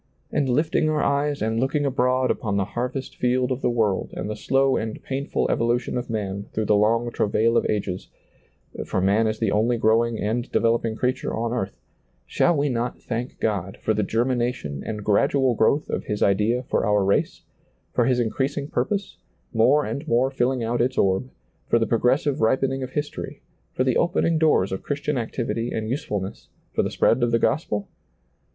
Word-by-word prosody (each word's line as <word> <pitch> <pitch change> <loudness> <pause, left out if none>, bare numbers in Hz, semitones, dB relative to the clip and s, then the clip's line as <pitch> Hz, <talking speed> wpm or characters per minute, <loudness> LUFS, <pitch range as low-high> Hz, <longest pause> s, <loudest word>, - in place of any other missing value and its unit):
And 140 -3 0
lifting 155 +4 +2
our 155 -1 +1
eyes 140 -2 0
and 110 +1 0
looking 145 +3 0
abroad 130 -1 +2
upon 105 -4 -2
the 100 - +1
harvest 125 +5 -4
field 125 +1 +1
of 130 +1 -2
the - - +1
world 110 -5 0
and - - -4
the 105 - -3
slow 135 +4 +2
and 110 0 -3
painful 135 +1 -1
evolution 120 +1 0
of 125 0 -3
man 100 -2 -3
through 110 - -1
the 105 - +3
long 115 +3 +2
travail 115 +2 +1
of - - +2
ages, 95 -3 -2 0.4
— - - -11
for - - -1
man 100 +4 +3
is 110 0 -1
the 110 -3 0
only 115 +3 +2
growing 115 +1 +2
and 120 +4 -2
developing 115 -1 +1
creature 125 +3 -1
on 115 +1 -2
earth, 100 -5 -3 0.3
— - - -42
shall 175 -2 +2
we 145 +1 +1
not 120 -2 -2
thank 120 +1 -5
God 100 -3 -2
for 110 - 0
the 105 - 0
germination 120 - -1
and 105 -2 -5
gradual 130 +5 +3
growth 130 +7 +2
of - - -3
His 105 - -1
idea 105 +5 +2
for - - 0
our 105 -2 +2
race, 100 - 0 0.5
for 120 - +2
His 125 0 +2
increasing 135 +5 -1
purpose, 195 +10 -2 0.4
more 130 +6 +4
and 145 +3 -5
more 125 +2 +2
filling 130 -1 0
out 120 +1 0
its 130 +2 0
orb, 95 +6 +1 0.4
for - - +3
the 115 - +2
progressive 130 +5 +1
ripening 130 +4 +1
of 130 0 -6
history, 145 -1 -4 0.3
for 130 - 0
the 130 -2 +2
opening 165 -1 +2
doors 150 - +3
of 95 - -3
Christian 150 +1 -2
activity 115 -1 -2
and 110 0 -3
use 140 - -2
fulness, 100 -2 -5 0.2
for - - +2
the - - -1
spread 120 - +2
of 120 - +2
the 115 - +3
gospel 105 -6 0
120 Hz, 190 wpm, -24 LUFS, 110-130 Hz, 0.5 s, more